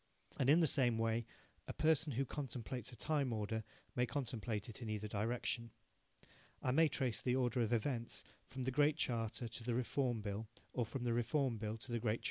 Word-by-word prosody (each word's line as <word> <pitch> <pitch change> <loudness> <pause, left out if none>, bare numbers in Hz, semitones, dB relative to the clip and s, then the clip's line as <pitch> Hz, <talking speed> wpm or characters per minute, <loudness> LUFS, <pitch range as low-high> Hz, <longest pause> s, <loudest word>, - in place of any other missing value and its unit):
And 135 - +2
in 160 +4 +7
the - - +6
same 125 -6 +4
way 115 0 +1 0.4
a - - -4
person 155 -2 +3
who 135 +4 +1
contemplates 125 -3 -4
a - - -9
time 145 -2 +1
order 110 0 -1 0.3
may 125 0 +2
contemplate 115 -6 -2
it 115 +1 -8
in 115 - -4
either 105 0 -2
direction. 115 +2 -1 0.9
I 125 - 0
may 160 +5 +6
trace 130 -5 0
the 125 -1 +2
order 125 -1 +2
of 115 -1 +1
events 120 0 0 0.2
from 130 -1 -5
the 130 - 0
Great 145 +3 +4
Charter 115 -3 0
to 115 +1 -6
the 120 0 0
Reform 125 -1 0
Bill 105 +1 -3 0.3
or 120 -3 0
from 120 +2 -4
the 120 -1 +1
Reform 120 0 +1
Bill 110 +1 -2
to 120 +2 -5
the 120 - +1
Great 110 -1 +1
Charter. - - -8
120 Hz, 205 wpm, -38 LUFS, 115-130 Hz, 0.9 s, in